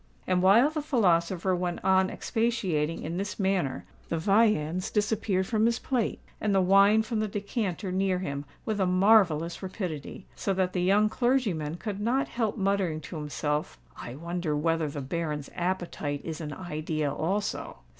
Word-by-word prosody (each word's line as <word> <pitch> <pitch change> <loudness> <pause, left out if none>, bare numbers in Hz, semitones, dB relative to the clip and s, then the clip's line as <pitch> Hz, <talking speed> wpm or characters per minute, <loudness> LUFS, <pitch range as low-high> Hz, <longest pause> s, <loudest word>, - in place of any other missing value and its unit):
And 180 -1 +1
while 225 +10 +6
the 310 -1 -2
philosopher 185 - +2
went 175 -1 -2
on 190 0 +4
expatiating 190 -10 -1
in 165 +3 -4
this 200 +3 -4
manner, 190 -8 0 0.2
the 165 - 0
viands 185 -2 +2
disappeared 210 -2 0
from 220 +2 +2
his 235 0 +1
plate 245 -4 -1 0.2
and 205 -2 +1
the - - +5
wine 195 +4 +5
from 220 0 -2
the 215 - 0
decanter 200 -2 -3
near 190 0 +1
him 140 -6 -4 0.2
with 215 -2 -1
a 185 - +3
marvellous 180 -4 +3
rapidity; 185 -4 -5
so 195 - -1
that 185 -1 0
the 180 - 0
young 200 +4 +4
clergyman 215 - 0
could 200 +2 -5
not 245 +6 0
help 225 -4 -1
muttering 195 -5 0
to 160 +2 -7
himself, 150 +1 -2 0.2
"I 120 - -8
wonder 170 0 -2
whether 165 0 0
the 145 0 -5
Baron's 150 0 -3
appetite 175 -5 -2
is 160 0 -5
an 150 -2 -5
idea 155 -3 -3
also." 200 +6 -2
185 Hz, 165 wpm, -28 LUFS, 160-210 Hz, 0.2 s, while